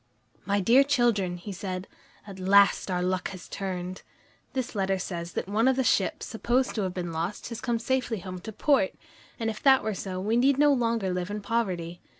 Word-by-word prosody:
"My 200 Hz, 0 st, +2 dB
dear 240 Hz, +8 st, +6 dB
children," 230 Hz, -10 st, +1 dB
he 190 Hz, +4 st, -8 dB
said, 185 Hz, -1 st, -5 dB, 0.4 s
"at 195 Hz, -2 st, -10 dB
last 200 Hz, +2 st, +4 dB
our 180 Hz, -1 st, 0 dB
luck 185 Hz, 0 st, -1 dB
has 185 Hz, -3 st, -9 dB
turned. 185 Hz, -1 st, -5 dB, 0.5 s
This 260 Hz, -2 st, -3 dB
letter 195 Hz, -2 st, 0 dB
says 175 Hz, -2 st, -5 dB
that -, -, -3 dB
one 215 Hz, +5 st, +2 dB
of 265 Hz, -, +4 dB
the 265 Hz, -, +1 dB
ships 200 Hz, -5 st, +1 dB
supposed 245 Hz, +3 st, 0 dB
to 215 Hz, -, -1 dB
have 185 Hz, -2 st, -2 dB
been 175 Hz, -2 st, -3 dB
lost 170 Hz, +8 st, -3 dB
has 230 Hz, -1 st, -6 dB
come 240 Hz, -2 st, 0 dB
safely 235 Hz, -1 st, -1 dB
home 185 Hz, 0 st, -6 dB
to 220 Hz, +5 st, -7 dB
port, 280 Hz, +6 st, +2 dB, 0.4 s
and 225 Hz, -, -1 dB
if 220 Hz, -1 st, -3 dB
that 265 Hz, -4 st, +5 dB
be 220 Hz, -, 0 dB
so, 185 Hz, -1 st, -5 dB
we 215 Hz, +5 st, +1 dB
need 265 Hz, +2 st, +4 dB
no 290 Hz, 0 st, +5 dB
longer 230 Hz, -7 st, 0 dB
live 180 Hz, +1 st, -3 dB
in 205 Hz, +1 st, -3 dB
poverty. 185 Hz, -6 st, -2 dB
200 Hz, 205 wpm, -27 LUFS, 185-235 Hz, 0.5 s, dear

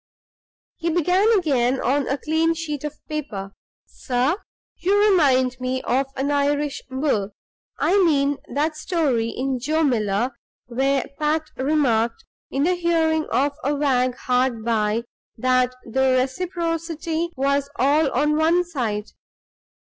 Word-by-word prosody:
He 335 Hz, -, -1 dB
began 360 Hz, +6 st, +3 dB
again 265 Hz, -7 st, +1 dB
on 275 Hz, +2 st, +1 dB
a 275 Hz, -, 0 dB
clean 320 Hz, +2 st, +1 dB
sheet 300 Hz, -4 st, -4 dB
of 300 Hz, 0 st, -5 dB
paper. 220 Hz, -11 st, -5 dB, 0.3 s
"Sir 260 Hz, +7 st, -1 dB, 0.4 s
You 390 Hz, +4 st, +2 dB
remind 280 Hz, -12 st, +3 dB
me 255 Hz, +1 st, -2 dB
of 265 Hz, +2 st, +1 dB
an 275 Hz, +2 st, -1 dB
Irish 285 Hz, 0 st, 0 dB
bull. 260 Hz, -7 st, -1 dB, 0.4 s
I 390 Hz, +1 st, +3 dB
mean 285 Hz, -4 st, +2 dB
that 305 Hz, +2 st, 0 dB
story 295 Hz, -9 st, 0 dB
in 260 Hz, +1 st, -2 dB
'Joe 310 Hz, +5 st, 0 dB
Miller' 230 Hz, -3 st, +1 dB, 0.3 s
where 265 Hz, +2 st, 0 dB
Pat 310 Hz, +1 st, +1 dB
remarked, 255 Hz, -5 st, +1 dB, 0.2 s
in 275 Hz, -, -1 dB
the 360 Hz, +4 st, +3 dB
hearing 325 Hz, -3 st, +1 dB
of 285 Hz, +2 st, +2 dB
a 285 Hz, +3 st, +1 dB
wag 255 Hz, -3 st, +1 dB
hard 250 Hz, -3 st, 0 dB
by, 220 Hz, 0 st, +1 dB, 0.3 s
that 255 Hz, +1 st, +2 dB
'the 260 Hz, +2 st, +2 dB
reciprocity 330 Hz, +3 st, -2 dB
was 280 Hz, +1 st, 0 dB
all 285 Hz, +3 st, +3 dB
on 300 Hz, +4 st, +2 dB
one 330 Hz, +3 st, +3 dB
side. 230 Hz, -11 st, -3 dB
280 Hz, 130 wpm, -22 LUFS, 255-320 Hz, 0.4 s, began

